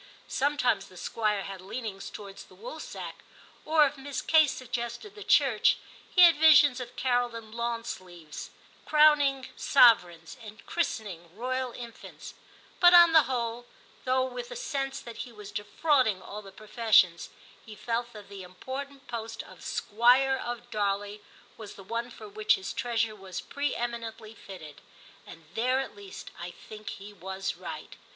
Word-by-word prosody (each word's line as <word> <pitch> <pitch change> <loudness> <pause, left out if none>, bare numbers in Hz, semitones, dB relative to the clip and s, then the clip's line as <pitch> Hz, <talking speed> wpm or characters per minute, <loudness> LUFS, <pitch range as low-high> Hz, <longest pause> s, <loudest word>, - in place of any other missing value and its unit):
Sometimes 265 -7 +1
the 185 - -16
Squire 210 0 -1
had 195 -1 -7
leanings 195 0 -6
to 210 - -9
wards 195 -1 -11
the - - -19
Woolsack, - - -8 0.4
or 310 -1 +5
if 285 +1 -3
Miss 280 0 -5
Kate 315 -2 +5
sug 255 -1 -7
gested 240 - -4
the 420 -1 -9
Church, - - +4 0.3
he 365 - +4
had 335 -3 +8
visions 295 -4 +7
of 250 - -8
Carol 245 -2 0
in 225 -1 -9
lawn 235 0 -2
sleeves 175 -8 -8 0.3
crowning 290 -3 +4
sovereigns 175 - +4
and 215 0 -12
christening 200 - -3
royal 255 +1 -2
infants; 235 -1 -10 0.5
but 350 0 +8
on 345 -1 +8
the 315 -4 +6
whole, 240 -1 -3 0.4
though 260 0 +2
with 485 - -6
a - - -7
sense 275 - -3
that 235 -1 -10
he 245 - -6
was 210 -2 -11
defrauding 250 -1 +1
all 210 +3 -8
the 195 -2 -12
professions, 210 -4 +2 0.3
he 215 - -11
felt 235 +3 -3
that 210 -3 -11
the 200 -1 -9
important 270 +10 -8
post 225 -1 -5
of - - -15
Squire 250 +5 +3
of 240 -1 -6
Darley 205 0 -1 0.4
was 215 -2 -9
the 195 - -12
one 230 +4 -3
for 245 - -11
which 420 0 +2
his 385 - -6
treasure 230 -2 -1
was 190 -3 -7
pre 285 +1 -3
eminently 230 -2 -5
fitted; 170 -9 -11 0.5
and 165 -2 -12
there 255 +5 +1
at 270 - -5
least 200 -1 -10
I 175 +1 -5
think 215 +4 -10
he 205 +1 -9
was 190 0 -4
right. - - -8
235 Hz, 160 wpm, -28 LUFS, 205-270 Hz, 0.5 s, had